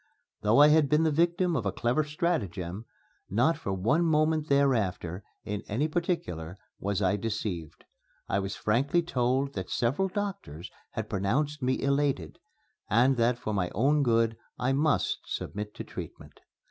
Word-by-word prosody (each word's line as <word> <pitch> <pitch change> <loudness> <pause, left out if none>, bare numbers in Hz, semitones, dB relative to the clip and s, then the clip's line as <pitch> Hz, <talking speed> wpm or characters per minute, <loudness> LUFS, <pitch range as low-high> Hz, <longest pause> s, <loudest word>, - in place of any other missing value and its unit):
Though 105 +4 +3
I 150 +1 +8
had 150 -2 +4
been 150 +1 +4
the 160 - +3
victim 170 +2 +2
of 125 - 0
a 100 - 0
clever 120 +10 +1
stratagem, 110 - -2 0.4
not 125 - +3
for 100 - -5
one 115 - +2
moment 155 -1 +2
thereafter, 105 -10 +1 0.2
in 105 0 -4
any 125 +9 0
particular, 95 - -3 0.2
was 100 0 -1
I 95 +2 +2
deceived. 100 -7 -4 0.4
I 100 - +1
was 100 0 -3
frankly 140 +10 +1
told 135 -2 0
that 95 -2 -5
several 135 +11 +1
doctors 185 - -5 0.2
had - - -3
pronounced 140 +10 -1
me 130 +1 +1
elated, 140 - 0 0.5
and 125 +5 +4
that 120 +1 +2
for 110 -2 -4
my 90 -3 0
own 145 +8 +3
good 115 -3 +2 0.2
I 125 +2 +1
must 150 +2 +1
submit 105 0 -5
to - - -5
treatment. - - -9
125 Hz, 155 wpm, -28 LUFS, 100-150 Hz, 0.5 s, I